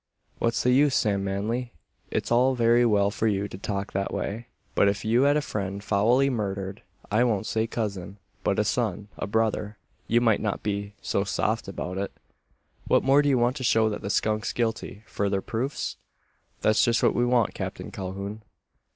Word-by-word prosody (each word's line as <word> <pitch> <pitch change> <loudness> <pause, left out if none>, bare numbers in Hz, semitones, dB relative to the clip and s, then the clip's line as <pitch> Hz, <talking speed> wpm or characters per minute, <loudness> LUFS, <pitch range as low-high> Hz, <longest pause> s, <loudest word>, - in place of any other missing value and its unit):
"What's 115 0 +1
the 125 - +3
use, 140 +1 +4
Sam 100 -2 +1
Manly? 110 +6 -2 0.4
It's - - -2
all 130 +2 +4
very 120 0 +4
well 100 -2 +3
for 110 +1 -1
you 100 -1 0
to 95 - -9
talk 100 +1 -4
that 100 0 -1
way; 115 +4 -4 0.3
but - - +4
if 100 +1 -1
you 115 +3 +3
had 145 +1 +4
a - - +1
friend 100 -3 -4
foully 115 +7 +3
murdered 100 -5 -3 0.3
I 110 +4 +4
won't 110 -4 +1
say 110 +1 0
cousin, 100 -4 -4 0.3
but - - +1
a - - +3
son, 105 - -1
a - - -3
brother 110 -1 0 0.3
you 115 - +4
might 115 -3 +3
not 105 -2 -2
be 100 0 -3
so 100 - 0
soft 110 +2 -1
about 95 -1 -4
it. 100 - -3 0.8
What - - +3
more 135 +2 +5
do 145 - +1
you 135 - +3
want 120 +3 +2
to 130 - -5
show 110 -2 +3
that 105 - -4
the 100 - -4
skunk's 105 +1 0
guilty? 110 -2 -2
Further 100 -2 -1
proofs?" 120 +8 -3 0.6
"That's 110 0 +4
just 115 -1 +2
what - - +4
we 120 - +1
want, 120 -3 +2
Captain - - -5
Calhoun." 100 +3 -5
110 Hz, 190 wpm, -26 LUFS, 100-120 Hz, 0.8 s, more